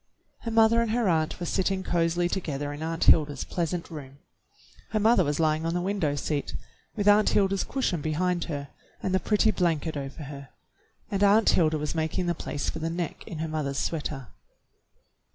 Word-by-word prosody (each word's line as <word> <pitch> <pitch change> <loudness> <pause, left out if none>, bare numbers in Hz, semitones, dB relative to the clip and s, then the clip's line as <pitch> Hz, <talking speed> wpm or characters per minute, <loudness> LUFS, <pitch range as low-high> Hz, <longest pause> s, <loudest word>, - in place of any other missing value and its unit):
Her 230 - -5
mother 225 +1 +4
and 230 - -1
her 230 -1 +1
aunt 160 -2 +1
were 175 - -3
sitting 190 +1 0
cozily 175 0 +1
to 190 - 0
gether 145 -4 -4
in 145 - -8
Aunt 165 +1 -2
Hilda's 145 -4 +4
pleasant 170 0 -3
room. 140 -3 -9 0.7
Her 215 - 0
mother 220 -2 +4
was 145 0 -1
lying 155 0 +2
on 165 +1 -1
the - - +1
window 175 -6 0
seat 145 0 -2 0.4
with 205 -2 -1
Aunt 210 +1 +6
Hilda's 195 -1 +2
cushion 225 - -1
behind 175 +3 0
her 145 -3 -5 0.3
and 185 - -1
the 190 - +3
pretty 215 +2 +2
blanket 165 -4 0
over 140 +2 -6
her, 140 -1 -9 0.6
and 200 0 +1
Aunt 210 +2 +5
Hilda 155 -2 +3
was 150 -1 -3
making 160 +2 -1
the 175 - +1
place 145 -3 -4
for 160 - -3
the 160 +1 -2
neck 170 -1 -4
in 165 - -6
her 160 +1 -2
mother's 150 -3 -2
sweater. 145 -5 -3
165 Hz, 190 wpm, -27 LUFS, 150-190 Hz, 0.7 s, Aunt